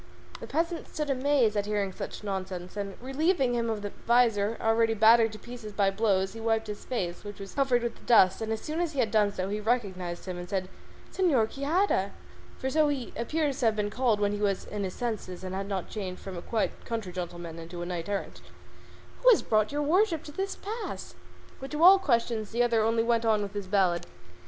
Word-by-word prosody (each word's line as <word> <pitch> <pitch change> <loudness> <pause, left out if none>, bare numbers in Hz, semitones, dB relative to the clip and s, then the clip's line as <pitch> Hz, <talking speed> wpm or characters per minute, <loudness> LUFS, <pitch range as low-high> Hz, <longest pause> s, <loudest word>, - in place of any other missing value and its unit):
The - - -8
peasant 335 +3 -1
stood 300 -2 -3
amazed 260 -4 +2
at 205 0 0
hearing 205 -2 0
such 185 - -7
nonsense, 185 -2 -4
and 200 -1 -4
relieving 270 +1 +1
him 235 -1 0
of 215 -2 -3
the 205 - -4 0.2
visor, 230 -3 +3
already 225 0 +2
battered 225 +1 +6
to - - -7
pieces 235 -1 -9
by 200 -1 +2
blows, 195 -2 +1
he 225 - -8
wiped 225 0 +1
his 210 -1 -7
face, 180 -9 -3
which 205 0 -8
was 195 -1 -8
covered 260 -4 +2
with 235 -1 -4
dust, 190 -5 +5
and 220 0 -2
as 220 - -2
soon 310 +2 -4
as 335 -2 -1
he 280 - -3
had 220 -4 +2
done 210 -2 +3
so 185 -2 -3
he 210 +1 -2
recognised 195 -6 -2
him 180 -2 -5
and 175 0 -7
said, 190 -2 -2 0.4
"Señor 295 - +3
Quixada" 280 - 0 0.4
(for 265 - -2
so 310 +1 +4
he 275 -5 -3
appears 285 +4 -1
to 245 - +1
have 220 - +2
been 210 -1 -1
called 240 -4 +1
when 205 -1 +2
he 205 0 -3
was 200 -2 0
in 210 -1 -4
his 185 -1 -4
senses 215 -7 -4
and 185 0 -5
had 195 +1 -3
not 195 -3 -2
yet - - -18
changed 190 -4 -5
from 190 -1 -6
a 170 - -5
quiet 220 +4 -2
country 225 -5 -4
gentleman 175 -2 -6
into 175 +1 -7
a - - -4
knight 175 0 -4
errant), 200 -1 -4 0.8
"who - - +7
has 460 - +6
brought 215 +1 +2
your 295 +1 -1
worship 335 +1 +2
to 295 - -9
this 390 +5 -3
pass?" 440 +3 -6 0.5
But 270 - -7
to 300 +3 -1
all 380 +2 +9
questions 235 - 0
the 240 +2 +1
other 235 -2 +2
only 225 +1 +2
went 230 0 +2
on 215 -2 +2
with 200 0 -6
his 205 -2 -4
ballad. 180 -3 +2
220 Hz, 225 wpm, -28 LUFS, 195-255 Hz, 0.8 s, all